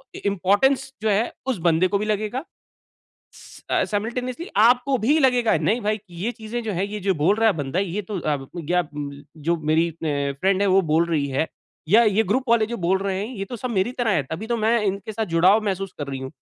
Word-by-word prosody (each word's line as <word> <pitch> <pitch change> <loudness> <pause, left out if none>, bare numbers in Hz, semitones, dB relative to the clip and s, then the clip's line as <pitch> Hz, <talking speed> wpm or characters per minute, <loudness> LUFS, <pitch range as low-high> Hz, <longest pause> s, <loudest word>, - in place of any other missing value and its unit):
इ - - -6
इम्पोर्टेंस 200 +8 +2
जो 220 - +1
है 210 +4 +1 0.2
उस 255 - 0
बंदे 170 +3 +4
को 200 +2 0
भी 210 - -2
लगेगा। 215 +5 -2 1.3
अ, - - +2
सायमलटेनीयस्ली 245 - -3
आपको 245 +5 +4
भी 275 +9 +3
लगेगा 250 -5 +3
नहीं 230 +4 +1
भाई 215 0 0
ये 175 +7 -3
चीज़ें 230 +1 -5
जो 215 -2 -3
है 190 +3 -1
ये 210 - -4
जो 190 0 +1
बोल 165 +7 +2
रहा 225 0 +2
है - - +4
बंदा 145 +2 -2
ये 195 +1 -1
तो 200 0 -5
अ, 150 -2 0 0.2
गया 175 +2 0
अ, 165 - -13 0.5
जो 165 +3 0
मेरी 165 +2 +3
अ, 145 -3 -2
फ्रेंड 195 0 +2
है - - +3
वो 190 +1 +5
बोल 165 +2 +3
रही 150 -4 0
है 140 +4 0 0.4
या 220 +7 +6
ये 215 0 +3
ग्रुप 255 +6 -1
वाले 230 -2 +4
जो 235 +2 -4
बोल 190 +1 +3
रहे 195 -1 -1
हैं 200 - -3
ये 195 - -4
तो 240 +5 -7
सब 250 +2 -4
मेरी 200 +3 0
तरह 235 -3 +1
है 145 - +1
तभी 170 +8 -4
तो 235 - 0
मैं 225 +1 +2
इनके 200 +2 -2
साथ 220 +1 -2
जुड़ाव 185 +5 +4
महसूस 195 -1 -2
कर 145 - -4
रही 135 - -4
हूँ। 130 - -6
200 Hz, 235 wpm, -23 LUFS, 175-225 Hz, 1.3 s, या